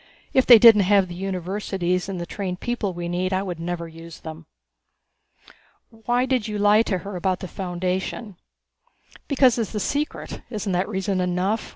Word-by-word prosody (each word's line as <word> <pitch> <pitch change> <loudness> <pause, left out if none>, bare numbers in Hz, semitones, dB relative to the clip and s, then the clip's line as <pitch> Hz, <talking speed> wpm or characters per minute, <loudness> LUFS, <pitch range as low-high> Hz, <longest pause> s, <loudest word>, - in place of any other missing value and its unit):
If 260 - +3
they 240 - +11
didn't 220 -2 +8
have 200 -2 +4
the - - -6
universities 185 0 -2
and 190 -2 -4
the 170 - -4
trained 180 -1 -5
people 240 -5 -2
we 175 -1 -5
need 180 +2 -1
I 190 +1 0
would 180 -4 -5
never 170 0 -4
use 165 0 -12
them." 160 0 -9 1.4
"Why 240 +3 0
did 255 -4 0
you 210 -1 -3
lie 205 +1 +5
to 205 -4 -1
her 200 -1 -6
about 185 +1 -1
the 185 - -6
Foundation?" 185 +3 -4 0.9
"Because 260 -4 +3
it's 225 -1 -3
a - - 0
secret 290 - -3
isn't 210 -3 -3
that 180 +2 0
reason 190 -2 -1
enough?" 180 +4 -1
190 Hz, 175 wpm, -23 LUFS, 180-215 Hz, 1.4 s, they